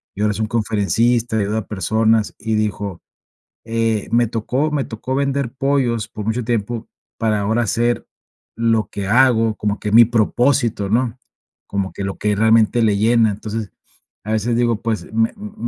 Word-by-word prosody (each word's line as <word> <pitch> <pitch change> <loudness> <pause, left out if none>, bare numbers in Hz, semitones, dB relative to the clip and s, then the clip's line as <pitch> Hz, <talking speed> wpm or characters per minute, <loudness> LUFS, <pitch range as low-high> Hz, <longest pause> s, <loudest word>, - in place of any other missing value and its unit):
Y 100 - -5
ahora 105 0 +2
es 105 - -6
un 110 - 0
conferencista, 115 +1 +1
ayuda 105 +1 0
a 105 - -8
personas 110 +2 +1
y 110 0 -1
dijo: 105 -4 -2 0.6
"Eh, 115 -2 -1
me 120 0 +4
tocó 125 +7 -1
me 140 -3 0
tocó 115 +4 -5
vender 140 -2 -1
pollos 135 -5 0
por 105 -1 -7
mucho 110 +2 -1
tiempo 115 0 -2 0.3
para 110 -2 +1
ahora 110 +4 +1
hacer 120 +2 0 0.5
lo 115 -1 +1
que 100 -1 -5
hago, 115 -2 +4
como 105 0 -2
que 105 -1 -3
mi 115 +1 +9
propósito, 120 -1 +1
¿no?". 120 +2 0 0.5
Como 100 -1 -2
que - - -6
lo 95 - -4
que 105 0 +1
realmente 110 +2 +3
le 105 -2 +3
llena. 110 +1 +3
Entonces, 105 +1 -5 0.5
a 110 - -3
veces 115 +2 0
digo: 120 -2 +1
"Pues, 115 -2 -2
me 115 0 +2
m 210 +1 -9
115 Hz, 170 wpm, -19 LUFS, 105-120 Hz, 0.6 s, mi